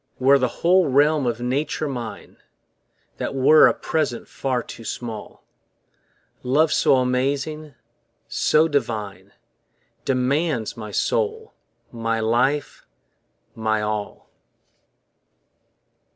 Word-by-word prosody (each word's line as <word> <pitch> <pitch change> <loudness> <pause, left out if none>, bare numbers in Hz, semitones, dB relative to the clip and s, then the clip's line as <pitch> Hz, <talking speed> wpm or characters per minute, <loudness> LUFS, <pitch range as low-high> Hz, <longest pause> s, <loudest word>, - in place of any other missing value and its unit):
Were 135 +2 +4
the 125 - +2 0.2
whole 180 0 +4
realm 145 0 +3
of 120 0 -2
Nature 145 +5 -1
mine, 120 -5 -7 0.8
That - - -4
were 135 +4 +6
a - - +2
present 155 -7 -2
far 130 -3 -2
too 115 - -10
small: 115 -1 -7 1.0
Love 150 +5 +2
so - - +4
amazing, 140 +4 -1 0.5
so 155 +1 +2
divine 110 - -3 0.7
Demands 135 -1 0
my 110 -2 -7
soul, 445 - -1 0.4
my 115 -1 -2
life, 125 +6 0 0.7
my 110 -1 -1
all. 105 -1 -4
130 Hz, 95 wpm, -22 LUFS, 115-150 Hz, 1.0 s, were